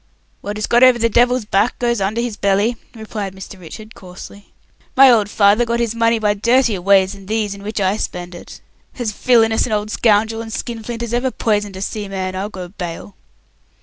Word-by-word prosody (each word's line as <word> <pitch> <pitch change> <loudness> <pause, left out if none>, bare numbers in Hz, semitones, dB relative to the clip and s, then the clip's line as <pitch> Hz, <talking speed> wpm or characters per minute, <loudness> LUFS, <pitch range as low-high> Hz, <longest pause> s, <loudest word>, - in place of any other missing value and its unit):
"What 205 +1 -5
is 215 - -2
got 240 - +2
over 255 -1 +7
the 230 0 +1
devil's 245 +1 +2
back 210 +3 +1
goes 235 -3 -1
under 210 +4 -1
his 240 -3 -3
belly," 200 +4 +1 0.2
replied 210 -3 -6
Mr. 190 0 -10
Richard, 215 +6 -11
coarsely. 185 +2 -13 0.4
"My 270 -1 +8
old 215 -4 +2
father 205 +2 +3
got 235 0 -1
his 235 -2 -1
money 230 0 +2
by 210 -1 +1
dirtier 235 -1 +1
ways 195 +1 +3
than 195 -1 -13
these 215 -1 -1
in 200 - -11
which 215 +2 -4
I 195 +1 +1
spend 180 -3 -5
it. 175 - -12 0.4
As 240 -4 -2
villainous 225 0 +2
an 220 - -3
old 210 0 -2
scoundrel 225 0 +1
and 225 -1 -8
skinflint 235 +1 -5
as 235 0 -5
ever 245 +2 +1
poisoned 210 -5 -1
a 190 - -4
seaman, 195 -3 -4
I'll 195 +2 -3
go 185 -3 -8
bail." 175 0 -7
215 Hz, 200 wpm, -18 LUFS, 200-235 Hz, 0.4 s, My